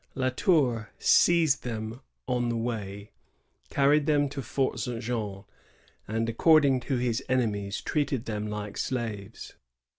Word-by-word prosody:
La 130 -1 +1
Tour 125 - +2
seized 165 -5 +4
them 115 +1 -5 0.3
on 125 -2 0
the 115 - -1
way, 105 -3 -4 0.6
carried 145 +1 +3
them 145 -2 +3
to 135 - -5
Fort 130 0 -1
St. 120 0 -3
Jean, 110 -5 -4 0.6
and, 115 +2 -1
according 140 +2 +4
to 125 +2 -2
his 120 +1 -1
enemies, 105 -6 0
treated 140 -5 -1
them 105 -1 -3
like 105 -1 -5
slaves. 115 -5 -4
120 Hz, 130 wpm, -28 LUFS, 110-135 Hz, 0.6 s, seized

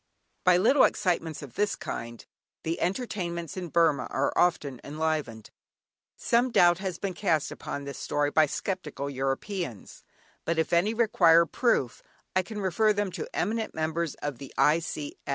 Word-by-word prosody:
By 180 -1 +5
little 260 +9 +5
excitements 165 -4 0
of 135 -5 -10
this 205 +4 0
kind 115 0 -6 0.4
the 165 +1 -2
entertainments 175 - -3
in 185 -2 -4
Burmah 165 -3 +2
are 135 - 0
often 145 -7 +1
enlivened. 150 -7 -3 0.7
Some 240 +2 +2
doubt 175 -6 +5
has 190 -3 -3
been 195 -1 -3
cast 170 -5 0
upon 145 - -6
this 140 -2 -7
story 145 0 0
by 155 0 +4
sceptical 150 -5 -4
Europeans, 135 - -4 0.4
but 165 0 -1
if 160 - 0
any 195 +7 +3
require 170 -7 +5
proof, 160 - 0 0.3
I 185 - +4
can 210 +3 -7
refer 210 +3 +2
them 205 -2 -1
to - - -5
eminent 220 +3 -2
members 160 0 -2
of 145 -4 -3
the 135 - -9
I. 155 +3 +4
170 Hz, 150 wpm, -28 LUFS, 145-195 Hz, 0.7 s, By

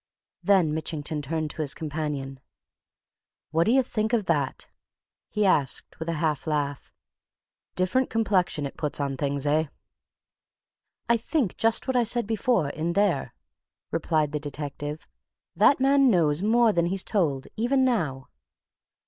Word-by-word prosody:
Then 185 -6 +3
Mitchington 155 -1 -3
turned 155 +2 -2
to - - -5
his 145 -3 +2
companion. 150 -3 -4 1.1
"What 165 +1 +2
d'ye 260 +3 +4
think 220 -1 -2
of 220 -4 +2
that?" 145 -6 -1 0.6
he 210 -1 0
asked, 145 -8 +1
with 160 +1 -4
a - - 0
half 155 -1 -1
laugh. 145 -2 -2 0.8
"Different 185 +9 +1
complexion 195 -9 +1
it 140 - -7
puts 150 -1 -1
on 140 -1 -1
things, 140 +1 -2
eh?" 155 +2 +2 1.4
"I 235 - +4
think 235 - -1
just 225 +3 +1
what 260 - 0
I 245 - +4
said 235 0 +1
before 225 - +1
in 160 +4 -2
there," 175 -11 0 0.6
replied 155 -3 0
the 150 - -2
detective. 145 +1 -6 0.5
"That 280 - +5
man 275 0 +4
knows 165 -6 +2
more 225 +1 +3
than 170 -1 +1
he's 190 +1 +1
told, 150 -10 0
even 260 +4 +2
now!" 155 - -1
165 Hz, 140 wpm, -26 LUFS, 145-220 Hz, 1.4 s, That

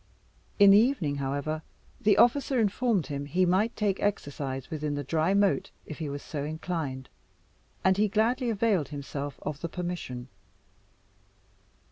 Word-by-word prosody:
In 200 -1 +8
the 200 - +8
evening, 205 - +1
however, 140 +3 -2 0.4
the 215 -3 +4
officer 265 +1 +4
informed 220 -3 +1
him 140 0 -4
he 180 +5 +2
might 195 +6 +2
take 200 -3 0
exercise 140 -9 -3
within 150 -2 -2
the 145 - -3
dry 160 +7 +1
moat 200 -1 +2 0.2
if 155 - -8
he 155 -3 -3
was 140 0 -5
so 145 -3 -4
inclined, 155 -4 -4 0.8
and 190 0 +4
he 210 +1 +3
gladly 235 +5 +1
availed 205 -7 +1
himself 145 0 -5
of 150 -1 -4
the 170 - -3
permission. 175 -9 -5
170 Hz, 145 wpm, -28 LUFS, 145-205 Hz, 0.8 s, In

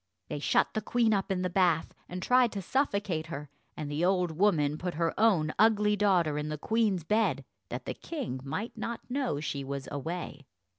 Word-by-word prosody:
They - - -3
shut - - +2
the 215 - -1
queen 230 -2 +2
up 195 -1 0
in 185 -1 0
the - - +1
bath, 175 -4 +2 0.2
and 180 0 -5
tried 250 0 +4
to 200 - -3
suffocate 200 - 0
her, 150 -3 -7 0.3
and 155 - -4
the 150 +3 -1
old 180 -2 +2
woman 155 -4 +2
put 175 -2 -3
her 165 +1 0
own 185 -8 +3
ugly 210 -1 +4
daughter 180 -8 +2
in 150 +1 -3
the 150 - -3
queen's 210 0 +1
bed 215 +7 +1 0.2
that - - -5
the - - -3
king 265 - -5
might 205 - -4
not 235 0 -4
know 260 - 0
she 140 -2 -3
was 135 -1 -5
away. 145 -1 -5
180 Hz, 195 wpm, -30 LUFS, 155-210 Hz, 0.3 s, tried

